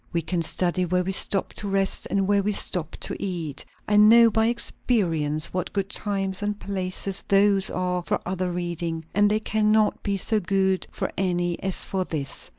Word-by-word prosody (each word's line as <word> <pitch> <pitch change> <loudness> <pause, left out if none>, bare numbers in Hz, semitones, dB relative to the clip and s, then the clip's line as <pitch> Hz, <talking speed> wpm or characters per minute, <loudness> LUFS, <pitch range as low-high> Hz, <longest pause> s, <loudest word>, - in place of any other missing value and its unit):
We 170 -1 -1
can 175 +1 -1
study 180 +2 0
where 180 +1 0
we 190 - -2
stop 195 0 0
to 205 - -4
rest 195 -1 -1
and 195 -1 0
where 200 0 +3
we 210 +1 0
stop 170 -5 +1
to - - -2
eat; 170 -7 -4 0.2
I 210 - +3
know 225 +2 +7
by 220 +1 +2
experience 170 - 0
what 180 0 -2
good 195 -1 -2
times 195 -2 -2
and 205 0 -2
places 190 0 -2
those 200 0 +3
are 180 0 -1
for - - -1
other 185 0 -2
reading; 170 -2 -4
and 205 0 +4
they 215 +1 +1
cannot 215 0 +1
be 200 -1 -1
so 215 +3 +2
good 190 0 0
for - - -3
any 175 -2 -1
as 190 -1 0
for 190 -1 -2
this." 145 -6 -4
190 Hz, 185 wpm, -24 LUFS, 175-205 Hz, 0.2 s, know